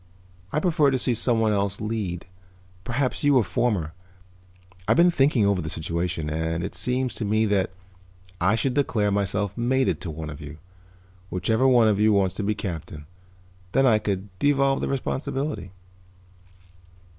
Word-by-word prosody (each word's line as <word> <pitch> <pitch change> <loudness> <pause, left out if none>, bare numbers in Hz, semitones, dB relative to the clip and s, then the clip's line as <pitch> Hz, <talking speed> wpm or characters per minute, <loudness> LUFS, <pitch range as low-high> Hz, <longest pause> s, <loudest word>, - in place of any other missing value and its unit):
I 150 - +1
prefer 155 -4 +3
to 135 - +1
see 125 0 +1
someone 115 -1 +1
else 100 -1 -1
lead, 105 -5 -3 0.6
perhaps 130 +5 -1
you 145 -2 +5
or 120 - +4
Fomar. 100 -10 -1 0.9
I've - - +3
been 175 +1 +6
thinking 135 -8 +3
over 100 -2 +2
the 80 - -5
situation 85 0 -2
and 80 +2 -2
it - - -4
seems 125 -1 0
to - - -3
me 110 +2 +1
that 100 -3 +1 0.7
I 95 +5 +3
should 130 +3 0
declare 110 -7 +1
myself 100 0 -1
mated 130 +2 0
to 90 - -4
one 80 -1 -6
of 75 +2 -10
you, 75 +1 -9 0.7
whichever 110 +8 +1 0.2
of 105 -2 +2
you 110 0 +4
wants 95 -3 +2
to 105 - -2
be 105 +1 0
captain. 80 -6 -6 0.7
Then 135 0 +4
I 110 -4 +4
could 100 -1 -3
devolve 135 -1 +2
the - - -1
responsibility." 135 - -3
105 Hz, 155 wpm, -24 LUFS, 90-130 Hz, 0.9 s, been